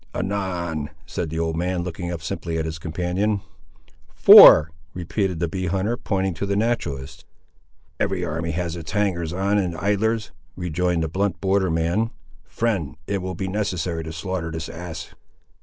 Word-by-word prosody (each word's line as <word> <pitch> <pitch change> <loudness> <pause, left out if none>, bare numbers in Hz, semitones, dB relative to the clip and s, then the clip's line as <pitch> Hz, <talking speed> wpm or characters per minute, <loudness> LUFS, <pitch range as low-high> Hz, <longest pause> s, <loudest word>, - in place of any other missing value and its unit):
"Anan," 90 -5 -2 0.2
said 85 - -4
the 80 - -4
old 80 0 -1
man, 90 +1 -1
looking 90 0 -5
up 85 -1 -5
simply 85 0 -3
at 80 - -1
his 80 0 -5
companion. 90 +6 -1 0.8
"Four," 75 +1 +10 0.2
repeated 90 0 -2
the 85 - 0
bee 95 +2 -3
hunter, 95 +6 0
pointing 95 -5 -1
to 100 +5 -4
the 100 - 0
naturalist. 100 - -2 0.8
"Every 95 -2 0
army 80 +1 -3
has 85 0 -2
its 80 -3 -7
hangers 90 -6 0
on 100 +3 +1
and 90 -4 -2
idlers," 105 +2 0 0.2
rejoined 90 -1 -1
the - - 0
blunt 95 +1 -1
border 95 0 +1
man. 85 +8 0 0.4
"Friend, 95 - -2
it 100 +1 -2
will 95 0 -4
be 95 +2 -3
necessary 90 -4 -2
to 80 - -6
slaughter 85 +1 -4
this 80 0 -5
ass." 85 -1 -7
90 Hz, 160 wpm, -23 LUFS, 80-100 Hz, 0.8 s, Four